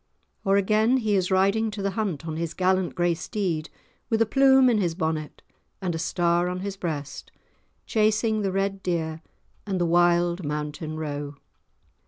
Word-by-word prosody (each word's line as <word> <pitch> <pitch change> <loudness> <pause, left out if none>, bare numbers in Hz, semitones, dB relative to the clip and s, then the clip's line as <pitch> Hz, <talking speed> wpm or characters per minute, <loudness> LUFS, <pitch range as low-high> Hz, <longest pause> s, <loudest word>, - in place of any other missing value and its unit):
Or 195 -2 +3
again 215 +5 +3
he 220 -4 0
is 185 -2 +1
riding 200 +4 +2
to 205 -1 -6
the 195 - 0
hunt 190 -7 -3
on 160 -2 -4
his 165 0 -4
gallant 185 0 +1
grey 175 -1 +2
steed, 170 -3 -3 0.4
with 225 - +1
a 225 - +4
plume 265 +2 +5
in 235 -4 +3
his 175 -4 0
bonnet 160 -3 -3 0.4
and 185 -3 -2
a 165 - -3
star 170 +1 +1
on 180 0 -3
his 200 0 -4
breast, 150 -6 -5 0.5
chasing 215 0 +1
the 195 -2 -1
red 195 0 -1
deer 160 -3 -2 0.5
and 190 -2 -1
the 175 - +2
wild 175 +1 +3
mountain 150 +1 -4
roe. 145 -2 -4
180 Hz, 170 wpm, -25 LUFS, 165-205 Hz, 0.5 s, plume